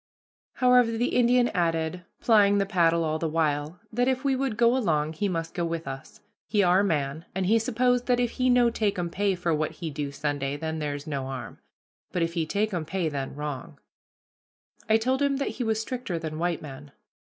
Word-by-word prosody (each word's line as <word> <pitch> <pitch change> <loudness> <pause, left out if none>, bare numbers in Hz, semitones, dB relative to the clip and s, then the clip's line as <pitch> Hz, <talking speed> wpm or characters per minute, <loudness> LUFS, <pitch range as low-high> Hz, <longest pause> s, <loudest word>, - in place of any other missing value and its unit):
However, 250 -2 +4
the 240 +2 0
Indian 245 0 +4
added, 165 0 -1 0.2
plying 205 -3 +5
the 200 - +2
paddle 170 -4 +2
all 155 0 -1
the 165 - -1
while, 155 +1 -1
that 245 +3 +1
if 260 0 0
we 275 -1 +2
would 260 -4 -2
go 235 +1 +4
along 155 -10 0
he 200 +5 -1
must 165 -2 -3
go 175 - -2
with 165 -2 -3
us, 135 0 -8 0.3
he 210 -2 +2
our 180 +1 +4
man, 155 -3 -1
and 190 -1 0
he 225 +4 +4
suppose 245 +2 +1
that 245 -1 +2
if 245 -1 +1
he 255 0 0
no 245 -1 +4
takum 195 -6 -1
pay 200 +1 +1
for 175 -2 -1
what 155 0 -1
he 165 -3 -5
do 145 -1 -4
Sunday 145 -1 -2
then 160 +1 -3
ther's 145 -1 -4
no 140 -4 -3
harm, 130 -3 -7 0.5
but 175 - 0
if 165 0 -2
he 165 -2 -1
takum 200 -3 -1
pay 170 0 -2
then 140 -2 -4
wrong. 145 -3 -6 1.1
I 220 - +6
told 260 +4 0
him 280 -1 +2
that 275 - -1
he 250 - -4
was 220 -1 0
stricter 240 -6 -3
than 160 -1 -5
white 175 -1 -1
men. 140 0 -10
175 Hz, 205 wpm, -26 LUFS, 155-230 Hz, 1.1 s, I